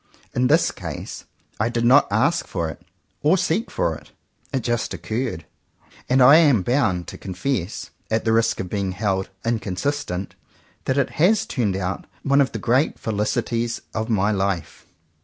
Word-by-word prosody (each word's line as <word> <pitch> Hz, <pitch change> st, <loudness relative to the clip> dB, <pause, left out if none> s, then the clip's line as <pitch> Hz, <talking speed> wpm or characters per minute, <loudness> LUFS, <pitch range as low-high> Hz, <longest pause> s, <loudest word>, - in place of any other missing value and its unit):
In 125 Hz, 0 st, +2 dB
this -, -, +4 dB
case -, -, -7 dB, 0.3 s
I 110 Hz, +2 st, +1 dB
did 120 Hz, 0 st, -1 dB
not 130 Hz, +4 st, +6 dB
ask 130 Hz, +11 st, +2 dB
for 85 Hz, -3 st, -2 dB
it, 75 Hz, -, -13 dB, 0.4 s
or 155 Hz, +6 st, +4 dB
seek 180 Hz, +5 st, 0 dB
for -, -, 0 dB
it. -, -, -13 dB, 0.4 s
It 135 Hz, -3 st, 0 dB
just 120 Hz, 0 st, -1 dB
occurred. 110 Hz, -, -3 dB, 0.6 s
And 130 Hz, 0 st, +5 dB
I 140 Hz, +5 st, +9 dB
am 140 Hz, -, +5 dB
bound 110 Hz, -8 st, +1 dB
to -, -, -9 dB
con 95 Hz, -2 st, -7 dB
fess, 105 Hz, -4 st, -2 dB, 0.2 s
at 110 Hz, +1 st, 0 dB
the 110 Hz, -, +3 dB
risk 115 Hz, 0 st, +2 dB
of 95 Hz, -, -3 dB
being 95 Hz, -1 st, -2 dB
held 95 Hz, -1 st, -1 dB, 0.2 s
inconsistent, 110 Hz, -2 st, -2 dB, 0.5 s
that 130 Hz, -, 0 dB
it 140 Hz, -, +1 dB
has 205 Hz, +5 st, +4 dB
turned 105 Hz, -7 st, -1 dB
out 95 Hz, -1 st, -3 dB, 0.2 s
one 140 Hz, +1 st, +4 dB
of 135 Hz, -, +1 dB
the -, -, -4 dB
great 130 Hz, +6 st, +1 dB
felicities 115 Hz, +2 st, -1 dB
of 110 Hz, +1 st, -2 dB
my 105 Hz, -1 st, +2 dB
life. 95 Hz, -4 st, -2 dB
115 Hz, 170 wpm, -23 LUFS, 95-135 Hz, 0.6 s, I